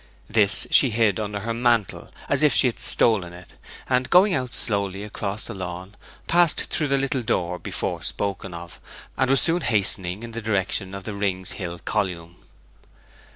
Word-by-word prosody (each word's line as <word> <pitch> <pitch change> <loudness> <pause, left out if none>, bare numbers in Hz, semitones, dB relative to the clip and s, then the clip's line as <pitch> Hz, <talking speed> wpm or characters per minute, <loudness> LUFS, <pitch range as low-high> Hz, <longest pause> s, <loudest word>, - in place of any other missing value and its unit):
This 105 -3 +3
she 135 - +6
hid 110 -2 +1
under 105 -1 -4
her 115 +3 -3
mantle, 115 -3 0 0.2
as - - +1
if - - +4
she - - +6
had - - 0
stolen 95 -7 +3
it; 90 0 -14 0.3
and, 125 0 0
going 185 +3 +5
out 125 -5 -1
slowly 100 -2 -2
across 105 0 -5
the 115 - -6
lawn, 90 0 -7 0.3
passed 170 -1 +3
through 155 - +1
the 140 0 +1
little 135 -1 -1
door 90 -5 -2
before - - -4
spoken 100 -1 -4
of, 85 0 -10 0.3
and 130 -1 0
was 135 0 +4
soon 170 +1 +3
hastening 100 - 0
in 115 - -7
the 115 +1 -6
direction 95 -2 -1
of 100 - -7
the 105 - -4
Rings 95 -2 -2
Hill 85 -3 -5
column. 90 -4 -3
105 Hz, 175 wpm, -23 LUFS, 95-120 Hz, 0.3 s, she